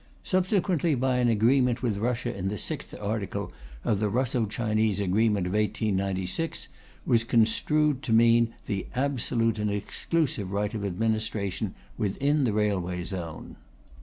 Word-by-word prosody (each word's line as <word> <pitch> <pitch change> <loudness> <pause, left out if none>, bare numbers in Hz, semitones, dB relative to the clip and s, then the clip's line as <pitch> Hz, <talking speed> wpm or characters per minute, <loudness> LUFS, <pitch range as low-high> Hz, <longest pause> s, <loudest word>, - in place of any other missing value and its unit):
Subsequently 185 -4 +1
by 130 0 +1
an 125 -1 +3
agreement 120 +2 +3
with 110 -5 0
Russia 120 +1 -1
the 95 +3 -2
sixth - - -4
article 105 -1 -3 0.3
of 100 - +1
the 105 -1 +1
Russo 120 0 0
Chinese 110 -1 0
Agreement 100 0 +2
of 90 - -3
1896 100 - -1 0.4
was 115 -2 +3
construed 130 +5 +2
to 125 - -4
mean 115 0 +5
'the 100 -2 -3
absolute 120 -4 0
and 105 0 0
exclusive 105 - -1
rights 105 +2 -1
of 105 -2 -3
administration 105 0 -1 0.2
within 140 +8 +1
the 115 - +2
railway 95 -4 0
zone.'" 85 -4 -6
110 Hz, 135 wpm, -27 LUFS, 100-125 Hz, 0.4 s, mean